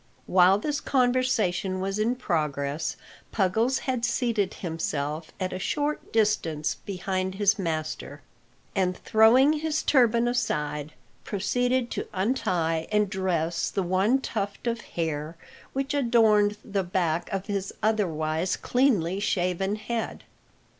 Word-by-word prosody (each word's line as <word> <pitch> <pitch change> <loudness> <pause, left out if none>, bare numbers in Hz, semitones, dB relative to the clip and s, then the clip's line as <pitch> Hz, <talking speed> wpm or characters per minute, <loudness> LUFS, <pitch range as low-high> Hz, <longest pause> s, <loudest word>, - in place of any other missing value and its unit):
While 185 +3 +5
this 295 +7 -2
conversation 245 -8 +1
was 195 +2 -2
in 230 +4 +1
progress 150 - -2 0.3
Puggles 225 +6 +1
had 255 -3 -2
seated 235 -5 0
himself 155 -2 -3
at 185 -1 -2
a 185 - -4
short 295 +9 -2
distance 170 -9 +1
behind 190 -1 -2
his 200 0 +2
master, 155 -4 -4 0.5
and 185 -2 +1
throwing 240 +7 +5
his 310 0 -1
turban 240 -3 +4
aside, 150 - -1 0.3
proceeded 245 +5 0
to - - -3
untie 180 -6 0
and 210 -2 +2
dress 170 -3 -1
the 195 - -1
one 190 +8 +2
tuft 200 -4 -4
of 235 -1 -1
hair 160 -3 -4 0.4
which 275 +2 -2
adorned 220 -6 +3
the 200 -1 -1
back 175 -2 -1
of 195 0 -2
his 200 -2 -3
otherwise 175 -5 0
cleanly 205 -9 +1
shaven 190 0 0
head. 225 +1 -4
195 Hz, 120 wpm, -26 LUFS, 170-235 Hz, 0.5 s, While